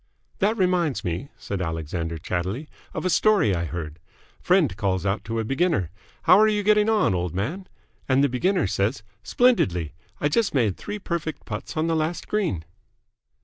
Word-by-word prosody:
"That 215 +4 +2
reminds 180 - +1
me," 90 +11 -3
said 100 -2 -4
Alexander, 80 0 -3
chattily, 95 - -3 0.2
"of - - -4
a - - +2
story 200 - +4
I 85 -1 -1
heard. 80 -1 -6 0.4
Friend 175 - +3
calls 95 -2 -1
out 100 +1 0
to 115 0 -2
a - - 0
beginner, 130 - 0 0.3
'How 185 - +7
are 215 - +6
you 210 -1 +1
getting 210 +1 +4
on, 210 - +3
old 90 -1 -2
man?' 160 - -3 0.4
and 135 +1 +4
the - - +5
beginner 180 +9 +1
says, 100 +5 -1 0.2
'Splendidly. 95 - +2 0.3
I 145 - +2
just 200 +3 +1
made 110 -8 +2
three 205 0 -6
perfect 170 -5 -4
putts 105 +7 -6
on 155 - +1
the 165 0 +1
last 160 +2 -2
green!'" 180 - -1
130 Hz, 175 wpm, -24 LUFS, -, 0.4 s, How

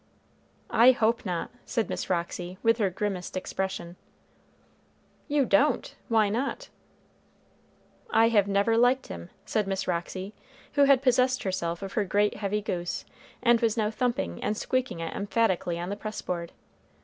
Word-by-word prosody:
"I 250 +3 +7
hope 230 -2 +1
not," 175 -2 -3
said 230 - -1
Miss - - -4
Roxy, 175 +1 -2
with 230 0 +3
her 200 -3 +2
grimmest 185 -1 -3
expression. 185 -2 -4 1.3
"You 290 -2 +2
don't! 245 +8 +2
Why 220 -3 +3
not?" 270 - -2 1.4
"I 225 +1 +5 0.2
never 200 +3 +2
liked 250 +2 +3
him," 85 0 -7 0.2
said 210 -2 0
Miss 195 -1 -2
Roxy, 185 +3 -3 0.4
who 285 -1 +5
had 275 -1 +5
possessed 255 0 +3
herself 185 -2 -2
of 195 - -6
her 210 - +1
great 205 +2 +1
heavy 210 0 -1
goose, 175 -3 -3 0.4
and 240 -1 +5
was 230 -1 +1
now 215 -1 +1
thumping 230 - -2
and 210 - -1
squeaking 255 -9 -1
it 165 - -4
emphatically 200 -4 0
on 175 +1 -4
the 200 - -2
press 215 +1 -6
board. 170 -2 -3
205 Hz, 150 wpm, -27 LUFS, 185-235 Hz, 1.4 s, I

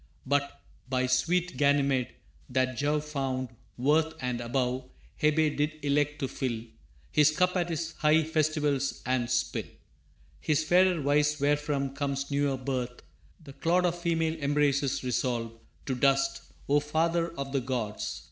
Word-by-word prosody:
But, 140 +1 0 0.3
by 130 -1 +1
sweet 170 +5 +1
Ganymede, 140 -3 +2 0.3
that 130 0 +1
Jove 145 +3 0
found 135 -4 -2 0.3
worth 155 +5 +2
And 125 -2 -2
above 125 +1 -1 0.4
Hebe 155 0 +3
did 150 +1 0
elect 145 +1 +1
to 135 - 0
fill 120 -4 -3 0.5
His 150 - +5
cup 180 +4 +1
at 175 -1 0
his 165 0 -2
high 155 +1 +4
festivals, 150 -3 0
and 125 -1 0
spill 120 0 -1 0.7
His 155 0 +1
fairer 180 +2 +4
vice 150 +1 +2
wherefrom 145 -1 0
comes 140 0 -3
newer 140 -1 +1
birth, 125 -2 -4 0.4
The 140 -3 -11
clod 175 +5 +1
of 175 -1 +1
female 165 -2 +1
embraces 140 -2 +1
resolve 120 -2 -1 0.3
To 135 - -1
dust, 135 +1 +1 0.2
o 145 +1 +4
father 165 +3 0
of 140 0 -4
the 135 -1 0
gods! 120 -5 -3
140 Hz, 140 wpm, -29 LUFS, 130-155 Hz, 0.7 s, His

